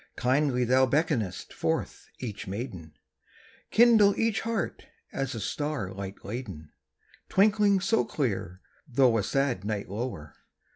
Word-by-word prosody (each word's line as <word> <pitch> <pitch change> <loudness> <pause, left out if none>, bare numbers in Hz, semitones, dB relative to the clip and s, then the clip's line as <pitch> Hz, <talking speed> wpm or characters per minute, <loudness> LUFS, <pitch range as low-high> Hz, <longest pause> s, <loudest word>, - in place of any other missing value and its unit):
Kindly 130 0 +2
thou 130 +2 +4
beckonest 120 - -1
forth - - -2
each 105 -6 -6
maiden; 95 - -6 0.8
Kindle 220 -3 +5
each 225 -3 +1
heart 225 -5 -3 0.3
as 135 -3 -2
a - - -4
star 135 -3 -3
light 95 0 -8
laden, 100 - -7 0.6
Twinkling 205 0 +4
so 225 +4 +2
clear, 95 - -3 0.3
though 125 -3 +3
a - - -1
sad 135 -5 0
night 105 -2 -3
lower! 100 -8 -5
125 Hz, 125 wpm, -28 LUFS, 100-155 Hz, 0.8 s, Kindle